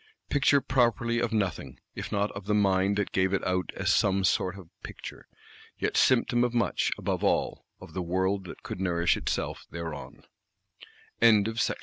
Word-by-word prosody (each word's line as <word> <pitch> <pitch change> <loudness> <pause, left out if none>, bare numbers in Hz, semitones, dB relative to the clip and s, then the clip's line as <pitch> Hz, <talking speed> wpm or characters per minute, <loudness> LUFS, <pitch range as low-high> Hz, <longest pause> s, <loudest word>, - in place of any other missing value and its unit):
Picture 140 0 +4
properly 120 -2 +1
of 120 0 -1
nothing, 100 -6 -2
if - - -6
not 100 +1 0
of 100 -1 -8
the 105 - +2
mind 100 -1 +2
that 105 - -1
gave 95 0 +1
it 95 - 0
out 90 0 -1
as 95 +1 +1
some 100 -2 +2
sort 90 0 +1
of 90 -4 -13
picture. - - -9 0.5
Yet - - -2
symptom 120 -1 +3
of 120 0 -1
much; 115 - +1
above - - -2
all, - - 0
of - - -12
the 95 - -3
world 95 +2 -1
that - - -10
could 90 - -6
nourish 85 -2 +2
itself - - -3
thereon. 80 -3 -7 1.0
BOOK 110 -3 +6
1.III. 115 +3 0
100 Hz, 175 wpm, -28 LUFS, 95-115 Hz, 1.0 s, BOOK